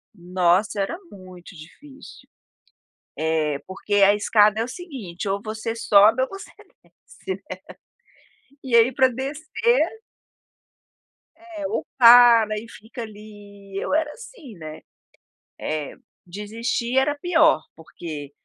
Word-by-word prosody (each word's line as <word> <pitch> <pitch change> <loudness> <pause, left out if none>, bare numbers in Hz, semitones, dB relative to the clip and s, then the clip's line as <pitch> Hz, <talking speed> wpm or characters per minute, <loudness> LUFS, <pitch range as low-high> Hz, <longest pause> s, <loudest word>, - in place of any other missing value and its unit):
Nossa 185 +3 0
era 265 +12 -3
muito 185 -1 -13
difícil. 265 - -15 0.9
É, 155 -2 0
porque 190 +2 -3
a 200 0 +6
escada 210 0 +3
é 230 - 0
o - - -7
seguinte, 250 - -7
ou 200 +1 -1
você 220 +1 -5
sobe 220 +2 +4
ou 260 - -1
você 390 0 -10 0.4
desce. 195 - -9 1.2
E 255 -3 0
aí 230 +2 +5
pra 260 +1 +4
descer 305 - -1 1.6
É, 330 -3 -8
ou - - -3
para 235 -3 +7
e 225 +2 -10
fica 230 +2 -10
ali, 205 -2 -12
eu - - -4
era 310 -1 0
assim, 440 - -13
né. 155 -1 -9 0.8
É, 155 -2 -4 0.3
desistir 225 +6 -3
era 290 +2 +2
pior, 320 -1 +3
porque 155 -3 -9
215 Hz, 115 wpm, -22 LUFS, 190-265 Hz, 1.6 s, para